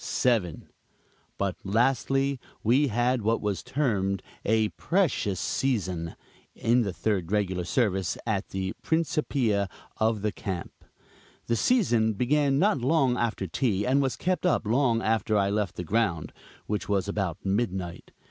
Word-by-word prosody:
7. 110 -10 0 0.7
But 100 -2 -1
lastly, 135 +5 +1 0.2
we 130 +6 +4
had 120 +1 +1
what 110 +2 +1
was 105 -2 -2
termed 100 -9 -1 0.2
"a 110 0 +2
precious 155 - 0
season," 95 -11 -1 0.4
in 120 +2 +2
the 100 -4 -1
third 90 0 -1
regular 95 -4 0
service 95 -5 0
at 105 -3 -1
the 95 0 -3
principia 140 - 0 0.3
of 110 -2 +1
the 105 - +1
camp. 95 -4 -5 0.7
This 115 -1 0
season 120 - +3
began 135 +5 +2
not 180 -2 +3
long 135 -1 +3
after 115 -5 -1
tea 100 +2 0
and 135 +2 +3
was 135 -2 0
kept 180 -2 -1
up 180 -9 +2
long 115 0 +2
after 110 -1 +1
I 100 0 +2
left 105 -2 -1
the 90 - -4
ground; 90 -3 0 0.3
which 105 -1 -3
was 100 -2 +1
about 95 -5 -2
midnight. 95 -4 -2
110 Hz, 140 wpm, -27 LUFS, 95-130 Hz, 0.7 s, we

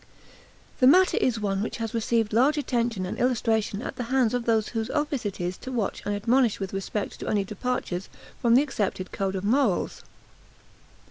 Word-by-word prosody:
The 255 - +6
matter 370 +6 +6
is 235 -3 +1
one 195 -2 -1
which 220 - -3
has 225 -2 -4
received 225 -1 0
large 270 +7 +4
attention 235 -8 -1
and 180 - -5
illustration 225 -3 0
at - - -6
the 250 - -3
hands 250 -2 +2
of 245 -1 -1
those 220 -2 +2
whose 225 0 -3
office 295 -6 -1
it 200 - -6
is 180 +1 -2
to 260 - -8
watch 230 -6 -2
and 205 - 0
admonish 235 +2 +2
with 195 -1 -4
respect 195 +2 -3
to - - -6
any 205 -2 +1
departures 195 -3 -3 0.3
from 235 -1 +4
the 265 - +6
accepted 200 -9 -3
code 195 -1 -2
of 190 - -3
morals. 225 -3 +1
225 Hz, 190 wpm, -26 LUFS, 200-250 Hz, 0.3 s, The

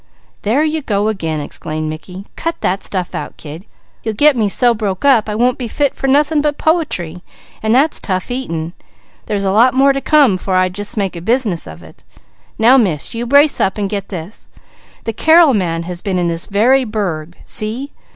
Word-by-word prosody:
"There 235 +9 +1
you 315 0 -1
go 210 -4 0
again!" 165 -7 -3
exclaimed 155 +1 -5
Mickey. 160 +5 -8
"Cut 330 0 -3
that 190 +2 -1
stuff 185 -3 -4
out, - - -6
kid! 160 +6 -10 0.3
You'll 220 -1 -3
get 295 +5 +5
me 215 -4 +1
so 240 +4 +3
broke 205 -1 -3
up, 235 -6 +4
I 210 - -2
won't 245 +3 +1
be 245 - -3
fit 285 +5 0
for 270 - -3
nothing 295 +2 +3
but 295 0 -1
poetry, 185 - -1 0.4
and 220 +2 +2
that's 290 +4 +2
tough 185 +2 -3
eating; 170 -10 -4 0.5
there's 205 -2 -1
a 190 - +1
lot 240 +6 +4
must 275 0 +3
come, 275 -10 +4
'fore 185 +1 -2
I 185 0 +3
just 205 +5 -6
make 195 -3 -1
a 170 - -6
business 220 -3 -1
of 80 +2 -11
it. - - -17 0.5
Now 240 +4 +5
Miss, 180 - 0
you 235 +1 -4
brace 285 +3 +4
up, 190 - +1
and 205 -1 -1
get 200 0 -4
this: 185 +2 -8 0.5
the 225 - -3
Carrel 320 +3 +5
man 170 -5 -1
has 175 0 -6
been 195 -3 -2
in 175 - 0
this 165 0 -4
very 245 +7 +3
burg. 180 -8 -4
See! 235 +7 0
215 Hz, 200 wpm, -16 LUFS, 180-265 Hz, 0.5 s, get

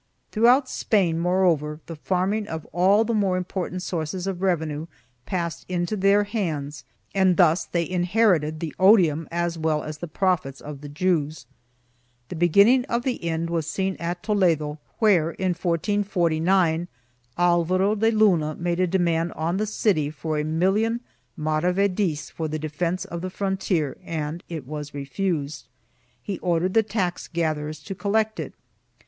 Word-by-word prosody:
Throughout 245 +5 +4
Spain, 180 -11 +1
moreover, 170 -4 +1
the 165 - -7
farming 190 +6 -1
of 160 -4 -5
all 190 +6 +4
the 230 +1 -1
more 195 -4 +1
important 185 0 -4
sources 175 +1 -3
of 190 -2 -3
revenue 160 -4 -1 0.4
passed 170 -3 -3
into 175 +3 -1
their 200 +1 +4
hands 155 -9 -3 0.3
and 190 -2 +3
thus 175 -1 +4
they 170 -1 -1
inherited 180 -4 +2
the 160 -2 -4
odium 175 -6 +5
as 170 0 -2
well 155 -1 0
as 155 0 -7
the 175 - -5
profits 160 -6 -1
of 145 -2 -9
the 145 - -8
Jews.1 155 -3 -1 0.8
The - - -5
beginning 200 +10 +5
of 235 0 -1
the 250 -7 -2
end 165 0 -2
was 165 -3 -1
seen 190 +2 -1
at 175 +1 -4
Toledo 165 -8 +1 0.2
where, 175 -7 +3
in 190 -1 -1
1449, 175 -1 +1 0.5
Alvaro 175 +3 +2
de 220 +1 +2
Luna 185 -9 +3
made 175 0 -2
a 185 - +3
demand 170 -2 +1
on 165 +3 -1
the 215 +1 -1
city 190 -8 +1
for 155 0 -3
a - - 0
million 195 +9 +1 0.4
mara 155 +3 +1
vedis 185 -6 0
for 160 - -3
the 155 0 -3
defence 165 +4 -2
of 170 0 -6
the 185 - -3
frontier 190 -7 -1
and 160 -1 -4
it 160 -6 -5
was 150 +1 -7
refused. 145 0 -3 0.6
He 195 -3 -4
ordered 175 +1 0
the 225 - +5
tax 195 -5 -2
gatherers 155 -2 -2
to 195 - -5
collect 215 +3 0
it. - - -5
175 Hz, 155 wpm, -24 LUFS, 155-195 Hz, 0.8 s, odium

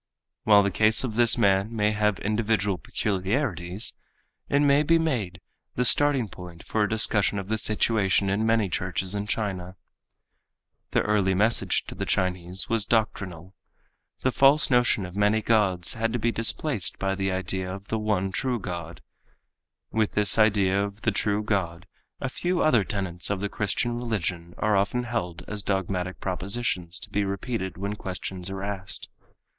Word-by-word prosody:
While 105 -1 +6
the 100 - 0
case 110 +4 +3
of 125 -4 -3
this 120 0 +4
man 100 +3 +2
may 105 -1 +2
have 105 -1 +1
individual 105 -3 0
peculiarities, 95 - -2 0.6
it 140 - +3
may 145 0 +4
be 165 +2 +3
made 120 - -2 0.4
the 125 - +1
starting 140 -2 +5
point 90 -3 -11
for 110 - -1
a 105 - +2
discussion 105 -2 +3
of 95 0 -5
the 110 - 0
situation 105 -3 +1
in 100 +3 0
many 115 -2 +2
churches 95 +1 -2
in 100 0 -3
China. 95 -4 -3 1.1
The - - +2
early 100 -3 +1
message 110 +5 +2
to - - -8
the - - -5
Chinese 90 0 -1
was 115 -3 0
doctrinal. 95 -6 -1 0.7
The 130 - +2
false 140 +3 +4
notion 120 -5 +3
of 90 +1 -10
many 105 +2 +3
gods 105 -6 +1
had 115 0 -1
to - - +1
be 120 +1 0
displaced 115 - -1
by 95 0 -1
the 95 0 -1
idea 95 0 -1
of 100 +2 -9
the 110 - -1
one 100 -3 0
true 125 +4 -1
God. 85 -3 -7 0.9
With 110 -2 0
this 105 0 +2
idea 100 -2 +3
of 100 +1 -6
the 110 - +1
true 105 +1 0
God 95 -6 -2 0.3
a - - -2
few 175 +7 -1
other 120 -9 +4
tenets 95 -4 -3
of 100 -1 -1
the 100 +1 -2
Christian 120 +4 -1
religion 90 -7 -3
are 105 -1 +1
often 100 +5 +1
held 110 -8 -4
as 105 -1 -2
dogmatic 95 -2 -2
propositions 95 -1 -3
to - - -6
be 105 - +1
repeated 100 0 -3
when 100 +2 -3
questions 95 -1 -6
are 95 0 -5
asked. 95 -2 -5
100 Hz, 165 wpm, -26 LUFS, 95-110 Hz, 1.1 s, While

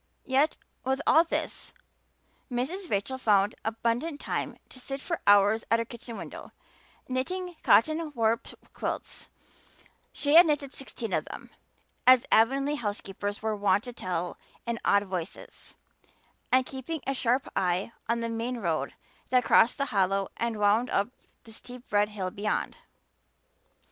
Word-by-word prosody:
Yet 275 +3 +2 0.3
with 265 +1 0
all 320 - +6
this 335 - -4 0.8
Mrs. 320 +10 -3
Rachel 230 +7 -1
found 205 -3 +3
abundant 235 +7 -1
time - - -3
to 255 - -12
sit 270 +2 -5
for 335 +4 -3
hours 205 +2 +5
at 230 - +4
her 230 - -1
kitchen 235 -1 -9
window, - - -9 0.5
knitting 355 +8 -3
"cotton 310 +6 +3
warp" 230 0 +1 0.3
quilts - - -5 0.8
she 290 0 0
had 335 +1 +9
knitted 290 -3 -1
sixteen 240 -4 -6
of - - 0
them, - - -10 0.6
as 255 -1 +7
Avonlea 275 +6 +3
housekeepers 205 -2 -4
were 220 -1 0
wont 205 0 +2
to 245 - -8
tell 180 -5 -3 0.3
in 235 -1 -2
awed 200 0 +4
voices 185 -3 -7 0.8
and 255 0 +4
keeping 270 +4 -5
a 270 - 0
sharp 255 +1 +1
eye 180 +4 0 0.2
on 235 0 +1
the 230 - -1
main 230 +2 -3
road 160 - -2 0.3
that 250 0 +4
crossed 235 - +5
the 280 - 0
hollow 195 0 +1
and 230 -2 -2
wound 210 +4 +3
up 200 +3 +1 0.3
the 225 - -13
steep 245 +1 -12
red 205 0 +3
hill 190 -3 -4
beyond. 205 +2 -2
235 Hz, 145 wpm, -28 LUFS, 205-265 Hz, 0.8 s, had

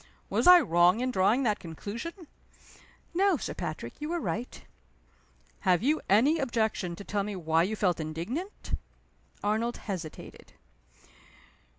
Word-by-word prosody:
Was - - +2
I 360 0 +11
wrong 175 - +4
in 255 +1 0
drawing 220 +5 +3
that 215 -4 +1
conclusion?" 230 - -7 0.9
"No, 380 0 +3
Sir - - -4
Patrick. 135 -6 -5
You 300 - -3
were 345 0 -1
right." 245 -5 -4 1.0
"Have 185 0 +2
you 300 +4 +2
any 270 +11 +4
objection 220 - -1
to 200 - -9
tell 200 0 -1
me 205 0 -4
why 160 -2 +1
you 200 +6 0
felt 180 -5 +1
indignant?" 175 - -4 0.7
Arnold 220 +3 0
hesitated. 180 -7 -7
215 Hz, 130 wpm, -29 LUFS, 180-275 Hz, 1.0 s, I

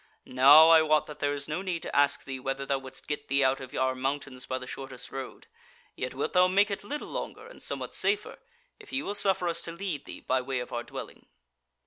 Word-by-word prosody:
Now 145 +5 +8
I 165 -1 +8
wot 155 -1 +3
that 150 - -10
there 145 0 0
is 140 0 -5
no 155 +4 -2
need 180 -4 -3
to - - -5
ask 140 0 +3
thee 135 -1 -6
whether 135 +1 -3
thou 135 0 0
wouldst 130 -1 -11
get 145 0 -4
thee 140 +1 +3
out 130 +1 +2
of 130 -1 -9
our 130 0 +1
mountains 135 0 -4
by 130 - -1
the 130 - -7
shortest 130 -1 -8
road, 135 -1 -7 0.5
yet 130 0 -4
wilt 140 - -2
thou 180 0 +6
make 200 +3 +3
it 200 - -4
little 295 +8 -5
longer, 435 +1 -6
and - - -13
somewhat - - -4
safer, 405 +1 0 0.4
if 425 - -14
ye 275 +1 -1
will 200 - -3
suffer 195 -3 +2
us 170 0 0
to 170 - -5
lead 170 -4 -4
thee - - -7
by 130 0 0
way 130 +1 -3
of 125 - -6
our 120 - -1
dwelling." - - -9
145 Hz, 240 wpm, -28 LUFS, 130-180 Hz, 0.5 s, Now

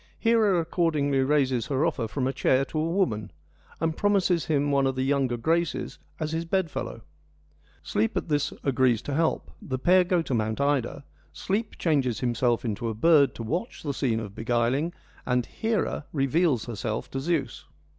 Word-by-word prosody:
Hera 220 -5 +3
accordingly 155 -5 +1
raises 130 -3 +1
her 140 +1 +1
offer 135 -9 -1
from 130 +4 -2
a 135 - 0
chair 130 0 +2
to 155 - -4
a 160 +2 0
woman, 115 - 0 0.5
and 160 0 0
promises 190 -4 +2
him 145 -2 +1
one 140 -1 +3
of 135 - -1
the 130 - -1
younger 135 -3 +1
Graces 165 +6 -1 0.2
as 155 -1 -2
his 165 +1 -1
bed 170 -1 -1
fellow. - - -5 0.8
Sleep 110 +2 0
at - - -2
this 145 -2 0
agrees 130 -4 +2
to 145 - -4
help, 160 +3 0
the 130 - -3
pair 180 +7 +4
go 175 -1 +1
to 135 - -3
Mount 110 0 -1
Ida, 140 0 0 0.3
Sleep 205 +4 -2
changes 135 -8 +1
himself 120 -1 +1
into 115 +1 -2
a 110 - -4
bird 150 +3 +4
to 115 - -6
watch 170 - -3
the 145 -2 -2
scene 125 -5 0
of 105 -3 -7
beguiling, 120 +8 0 0.3
and 125 -2 0
Hera 220 -8 -2
reveals 140 -2 +1
herself 110 -1 -4
to 135 - -3
Zeus. 140 -4 -2
140 Hz, 175 wpm, -26 LUFS, 125-165 Hz, 0.8 s, pair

